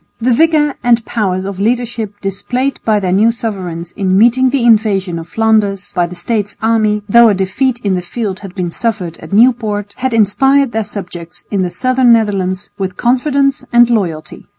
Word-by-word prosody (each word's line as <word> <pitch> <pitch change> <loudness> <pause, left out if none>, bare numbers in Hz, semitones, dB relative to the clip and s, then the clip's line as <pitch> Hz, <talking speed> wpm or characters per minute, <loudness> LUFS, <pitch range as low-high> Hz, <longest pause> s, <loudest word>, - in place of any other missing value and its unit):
The 240 +2 +1
vigour 305 +1 +2
and 235 -2 +2
powers 190 -4 -2
of 195 -1 -6
leadership 225 -2 -2
displayed 245 +7 -2
by 215 -2 +2
their 185 -3 -2
new 210 +5 +3
sovereigns 185 -7 -5
in 190 -2 0
meeting 245 +4 +4
the 270 -2 0
invasion 200 -6 +2
of 165 - -9
Flanders 215 -3 0
by 175 -2 0
the 180 - -10
States' 205 +3 -2
army, 215 -2 +1
though 235 +2 +6
a 205 - +2
defeat 235 +7 -1
in 200 - +1
the 180 - -1
field 195 +1 -5
had 195 -2 -11
been 180 -3 -3
suffered 185 -6 -3
at - - -12
Nieuport, 210 -2 +1
had 260 -2 -1
inspired 270 +5 +2
their 225 -1 -1
subjects 180 -4 -8
in 200 -2 0
the 180 - -1
southern 255 +4 +2
Netherlands 195 -4 -1
with 185 -2 -4
confidence 275 +2 +1
and 240 0 +4
loyalty. 165 -9 -3
215 Hz, 180 wpm, -14 LUFS, 190-240 Hz, -, though